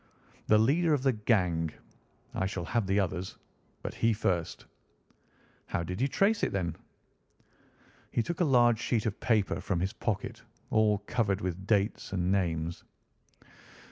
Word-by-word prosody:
"The 110 - +6
leader 150 +8 +3
of 135 - -3
the 135 - +4
gang. 90 -7 +1 0.6
I 95 - 0
shall 95 -3 -4
have 115 +2 0
the 95 +1 +2
others, 90 -1 -2 0.5
but - - -4
he 115 0 +2
first." 90 -6 -1 1.0
"How 85 - -1
did 90 +5 -4
you 135 - +3
trace 205 +9 +2
it, - - +1
then?" 85 -4 -2 1.3
He 115 - 0
took 170 +7 -4
a - - +4
large 120 -6 +4
sheet 115 -3 0
of 105 -3 -2
paper 110 -5 +1
from 95 -4 -1
his 95 +2 -1
pocket, - - -3 0.3
all 110 -1 +4
covered 105 -5 0
with 95 +1 -4
dates 105 -1 +1
and 90 -1 0
names. 85 -3 -1
100 Hz, 150 wpm, -30 LUFS, 90-115 Hz, 1.3 s, The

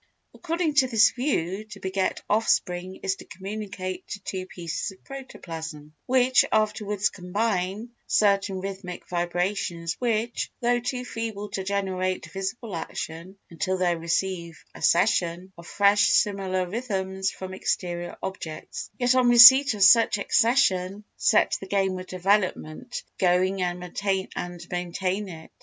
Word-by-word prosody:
According 335 -2 -2
to 265 -3 +5
this 225 -3 +5
view 215 - -1
to 225 - -11
beget 190 0 -2
offspring 185 -4 0
is 190 0 0
to - - -12
communicate 190 -1 -6
to 210 - -6
two 185 -1 -5
pieces 170 -3 -4
of 190 -1 -14
protoplasm 160 - -8
(which 255 0 +4
afterwards 210 -1 +1
combine) 200 +3 -2 0.2
certain 195 -2 +2
rhythmic 190 -2 -7
vibrations 175 -1 -2
which, 235 -1 -1
though 240 0 +2
too 250 +1 -4
feeble 220 -3 -5
to 195 - -4
generate 185 -1 -2
visible 195 +2 -5
action 165 +3 -6
until 185 +3 -1
they 180 -2 +1
receive 170 0 -3
accession 175 +2 +1
of 170 0 -13
fresh 200 0 +4
similar 190 -3 +1
rhythms 190 -3 -2
from 185 0 -8
exterior 175 -2 -3
objects, 165 -5 -6
yet 245 0 +3
on 255 -1 +4
receipt 245 +2 +9
of 200 - +2
such 225 +2 +6
accession 200 -3 +2
set 210 - +3
the 195 - -9
game 190 -1 0
of 185 - -9
development 190 +2 -1 0.2
going 185 +1 +2
and 180 0 -1 0.9
maintain 185 +3 -2
it. 160 -2 -11
190 Hz, 130 wpm, -25 LUFS, 180-215 Hz, 0.9 s, receipt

